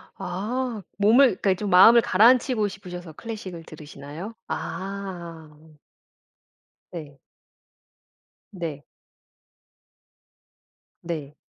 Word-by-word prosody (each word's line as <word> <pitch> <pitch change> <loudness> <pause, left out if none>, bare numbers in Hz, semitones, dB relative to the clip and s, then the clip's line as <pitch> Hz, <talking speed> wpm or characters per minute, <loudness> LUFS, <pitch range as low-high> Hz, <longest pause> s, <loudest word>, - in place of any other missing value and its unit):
아 220 +5 -3 0.2
몸을 220 +7 +6 0.2
그러니까 195 -2 +3
좀 205 +2 -4
마음을 225 +6 +8
가라앉히고 230 +1 +4
싶으셔서 180 -4 -9
클래식을 190 -4 -7
들으시나요? 155 +5 -9
아. 175 -6 -6 1.3
네. 150 -5 -9 1.3
네. 165 -6 -6 2.2
네. 155 -4 -6
185 Hz, 170 characters per minute, -24 LUFS, 160-210 Hz, 2.2 s, 마음을